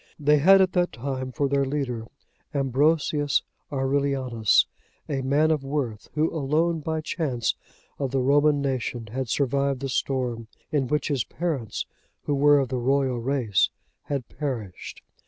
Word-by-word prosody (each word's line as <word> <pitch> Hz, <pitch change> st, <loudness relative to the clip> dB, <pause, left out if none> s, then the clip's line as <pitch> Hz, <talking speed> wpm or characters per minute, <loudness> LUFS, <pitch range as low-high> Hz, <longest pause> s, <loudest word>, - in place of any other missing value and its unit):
They 150 Hz, 0 st, +4 dB
had 195 Hz, +6 st, +7 dB
at 185 Hz, -1 st, +3 dB
that 180 Hz, -1 st, +2 dB
time 130 Hz, +2 st, -4 dB
for 140 Hz, +3 st, 0 dB
their 140 Hz, 0 st, +2 dB
leader, 130 Hz, -5 st, -2 dB, 0.5 s
Ambrosius 145 Hz, +2 st, +2 dB, 0.3 s
Aurelianus,(90) 135 Hz, -4 st, +2 dB, 0.4 s
a 140 Hz, -2 st, -1 dB
man 145 Hz, +4 st, +2 dB
of 150 Hz, -3 st, 0 dB
worth, 135 Hz, -6 st, -3 dB
who 155 Hz, +1 st, +1 dB
alone, 160 Hz, +3 st, +1 dB
by 160 Hz, +1 st, -2 dB
chance, 140 Hz, -8 st, -1 dB, 0.5 s
of 135 Hz, -2 st, -1 dB
the 135 Hz, -, -1 dB
Roman 145 Hz, +2 st, +3 dB
nation 120 Hz, -4 st, -2 dB
had 130 Hz, 0 st, -3 dB
survived 140 Hz, +1 st, +1 dB
the 135 Hz, -, -3 dB
storm, 125 Hz, -3 st, -1 dB, 0.2 s
in 140 Hz, -4 st, +1 dB
which 150 Hz, +3 st, 0 dB
his 135 Hz, -5 st, +1 dB
parents, 145 Hz, -, -3 dB, 0.4 s
who 145 Hz, -, -1 dB
were 145 Hz, +1 st, +5 dB
of 135 Hz, -3 st, +1 dB
the 130 Hz, -1 st, -1 dB
royal 130 Hz, 0 st, +1 dB
race, 115 Hz, -6 st, +1 dB, 0.4 s
had 140 Hz, -5 st, -3 dB
perished. 120 Hz, -11 st, -5 dB
140 Hz, 150 wpm, -25 LUFS, 125-145 Hz, 0.5 s, had